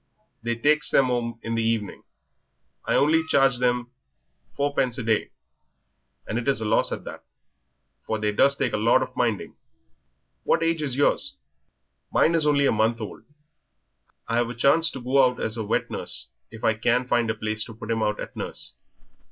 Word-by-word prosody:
They 120 +1 -2
takes 150 +6 +2
them 130 -2 +3
'ome 115 -2 -2
in 115 - -3
the 115 - 0
evening. 110 -3 -2 0.8
I - - +1
only 160 +3 +3
charges 135 -4 +3
them 125 -1 0 0.6
four 145 0 0
pence 125 -2 0
a 125 - -4
day, 110 -1 0 1.0
and 110 - -2
it 120 - -6
is 135 -4 +2
a 110 - -3
loss 105 - +2
at - - -4
that, - - -9 0.8
for 110 - -1
they 105 0 0
does 140 +6 +4
take - - -1
a - - +1
lot 110 +3 +3
of - - -9
minding. - - -1 0.9
What - - +2
age 165 -1 0
is 140 -4 -2
yours?" 275 - +1 0.8
"Mine 165 - +3
is 160 -2 +2
only 140 -1 +3
a - - +4
month 110 +2 +1
old. 110 - -8 1.0
I've 115 0 0
a 120 - -6
chance 155 +7 +4
to 135 - -7
go 135 +2 +3
out 125 -1 +1
as 110 +1 -2
wet 110 - -1
nurse 65 - -1 0.2
if 110 0 -12
I 115 - +3
can 120 +3 0
find 120 -2 +1
a 110 - 0
place 110 0 -3
to 115 - -11
put 115 0 -6
him 115 -1 0
out 105 -1 0
at - - -7
nurse. - - -4
120 Hz, 190 wpm, -25 LUFS, 110-140 Hz, 1.0 s, does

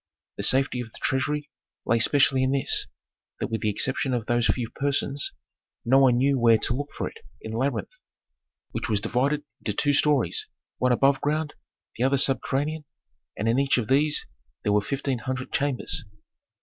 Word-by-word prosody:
The - - -3
safety 130 -1 +2
of 120 - -7
the - - -13
treasury 145 +2 -1 0.3
lay 115 +1 +2
specially 135 +1 +3
in 130 +1 +1
this: 135 - +1 0.5
that - - -2
with 110 -2 -3
the 110 - +1
exception 130 +4 0
of 115 -3 -3
those 120 0 +1
few 120 -3 -1
persons, 140 0 -1 0.5
no 130 +3 +5
one 130 -3 +5
knew 135 +1 +2
where 115 -1 +5
to 115 - 0
look 145 +3 -4
for - - -4
it - - -11 0.2
in 110 - -8
the 110 - -3
labyrinth, 140 - -2 0.8
which - - -4
was 105 -2 +2
divided 135 +7 0 0.2
into 105 - -3
two 145 +7 +1
stories, 140 - +2 0.3
one 125 0 +2
above 135 +3 +3
ground, 150 +1 -1 0.4
the 120 - 0
other 135 +1 +3
subterranean, 140 +3 +1 0.5
and 110 - -2
in 115 +3 +2
each 140 -1 +2
of 120 -2 -2
these 145 +3 +2 0.4
there 105 - +1
were 105 - +3
fifteen 135 +2 -2
hundred 130 +1 -4
chambers. 140 -2 0
130 Hz, 180 wpm, -25 LUFS, 120-140 Hz, 0.8 s, no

